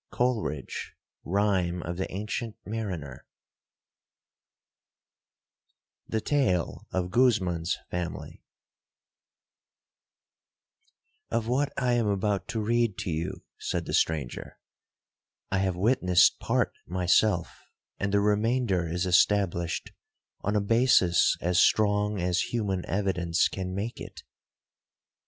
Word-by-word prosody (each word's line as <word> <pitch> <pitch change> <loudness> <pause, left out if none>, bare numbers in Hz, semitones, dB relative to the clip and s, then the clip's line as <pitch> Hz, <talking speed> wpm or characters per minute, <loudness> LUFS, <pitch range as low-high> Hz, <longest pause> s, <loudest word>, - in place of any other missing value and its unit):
COLERIDGE—Rhyme 95 - -2
of 85 +1 -5
the 95 - -3
Ancient 105 +3 -4
Mariner 90 - -5 2.8
The 110 - -1
Tale 110 - 0
of 90 -1 -2
Guzman's 95 -9 +2
Family 90 -1 -5 2.9
'Of 115 -1 -1
what 135 +4 +1
I 125 -2 +1
am 120 -3 +1
about 100 0 0
to 115 - -3
read 115 -2 +1
to 100 -3 -3
you,' 85 +3 -4 0.2
said - - -2
the - - -5
stranger, 75 -6 -1 0.9
'I 95 - +1
have 95 -2 0
witnessed 90 -3 +3
part - - 0
myself, 90 +1 +1 0.4
and 100 0 -1
the 100 0 +3
remainder 105 -3 +1
is 90 +2 -1
established 90 -2 +2 0.5
on 105 +2 -2
a 105 - +3
basis 115 -5 +4
as 90 +1 +2
strong 105 -1 +3
as 90 0 0
human 100 -6 -1
evidence 90 -2 +1
can 95 -1 -5
make 105 +4 -4
it. - - -9
95 Hz, 100 wpm, -27 LUFS, 90-110 Hz, 2.9 s, basis